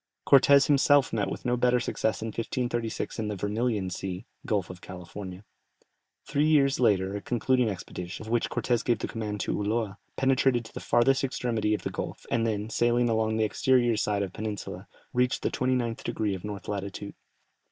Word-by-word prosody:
Cortès 140 0 +7
himself 145 -1 +4
met 105 -3 0
with - - -6
no 125 0 +2
better 125 0 +3
success 110 -3 -1
in 115 - -3
1536 115 +1 -3
in 110 - -1
the 105 - -2
Vermilion 105 0 -1
Sea 95 +1 -5 0.2
(Gulf 100 -5 0
of 90 -1 -12
California). 95 +1 -8 0.8
Three 145 +1 +1
years 140 -3 +4
later 100 -5 +2
a 100 - -4
concluding 125 +1 +1
expedition, 90 0 -6
of 110 - -7
which 120 -1 +1
Cortès 120 -2 0
gave 120 - +2
the - - -4
command 105 -2 -4
to - - -1
Ulloa, 105 -1 -1 0.2
penetrated 130 -2 +2
to - - -13
the - - -5
farthest 135 +3 +3
extremity 115 -5 0
of - - -7
the - - -3
gulf, - - -5
and 115 -1 +2
then, 105 -1 -1
sailing 120 +1 +2
along 110 -1 +1
the 110 - +2
exterior 120 +2 +3
side 105 -1 0
of 95 - -4
the - - -14
peninsula, 105 -1 -5 0.3
reached 125 +1 +1
the - - 0
29 125 -2 0
degrees 105 -3 -1
of 90 - -14
north 105 -2 -6
latitude. 100 -1 -4
110 Hz, 185 wpm, -28 LUFS, 105-125 Hz, 0.8 s, Cortès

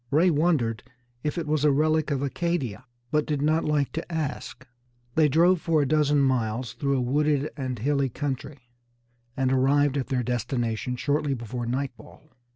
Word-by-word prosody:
Ray 170 +5 +4
wondered 145 -8 +1 0.4
if 150 +3 -2
it 170 - -2
was 150 -1 0
a 150 - +5
relic 155 +2 +2
of 140 -2 -1
Acadia, 140 -6 -2 0.3
but 150 0 +1
did 150 -2 -1
not 155 +3 +1
like 150 -2 +1
to 165 +2 -5
ask. 150 -4 -4 0.5
They 155 +1 +4
drove 170 +4 +4
for 165 -2 +2
a - - -1
dozen 150 0 +3
miles 120 -3 0
through 140 +3 0
a - - 0
wooded 145 +3 +1
and 130 -3 -4
hilly 140 +3 0
country, 135 -1 -5 0.7
and 135 -1 +1
arrived 140 +2 +3
at 135 - -2
their 125 -2 0
destination 120 0 -2
shortly 145 +2 0
before 120 0 -5
nightfall. 135 +4 -5
140 Hz, 165 wpm, -26 LUFS, 130-150 Hz, 0.7 s, a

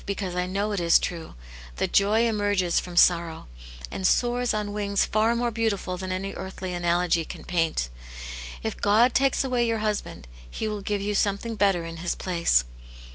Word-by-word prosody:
149 200 -1 -2
because 185 -3 -4
I 180 0 -1
know 200 +2 -1
it 200 - -1
is 170 -1 +5
true, 170 -2 -5 0.4
that - - -2
joy 210 +3 +4
emerges 205 -5 +1
from 175 -1 -8
sorrow, 170 -2 +3 0.4
and 190 - 0
soars 245 +2 +2
on 210 -1 -2
wings 200 -1 +1
far 220 +2 +2
more 240 0 0
beautiful 215 -5 -1
than 185 0 -5
any 195 +1 -3
earthly 190 -1 -6
analogy 175 -1 +1
can - - -9
paint. 165 - 0 0.8
If - - -4
God 220 +5 +4
takes 275 0 +2
away 250 -3 +1
your 230 -1 0
husband, 205 - -3 0.2
He 220 - -4
will 210 -1 -3
give 205 0 -2
you 205 +1 -1
something 205 +3 0
better 195 -5 +2
in 165 0 -7
his 170 +1 -2
place." 170 - +2
200 Hz, 185 wpm, -25 LUFS, 175-215 Hz, 0.8 s, is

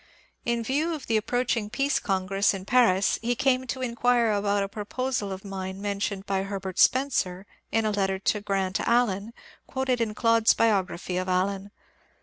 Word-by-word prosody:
In 235 -1 0
view 300 +8 0
of 290 - -8
the 225 - 0
approaching 230 0 0
Peace 275 +5 0
Congress 195 0 +1
in 190 -1 -7
Paris 215 -5 +3
he 240 +2 0
came 260 +1 +1
to 260 +1 -3
in 240 -2 -2
quire 240 -1 +2
about 205 -1 +1
a - - -2
proposal 215 +1 -3
of 190 +1 -7
mine 190 -1 -5
mentioned 200 -1 -3
by 195 -1 0
Herbert 195 -1 -5
Spencer 205 -9 +2 0.3
in 225 0 +1
a 215 - +1
letter 195 -2 0
to 205 +2 0
Grant 195 -2 -1
Allen 230 -3 +1 0.4
quoted 260 -2 -1
in 215 -2 -1
Clodd^s 230 -1 +3
biography 190 -4 0
of 185 0 -2
Allen. 195 +2 0
210 Hz, 170 wpm, -26 LUFS, 195-240 Hz, 0.4 s, Paris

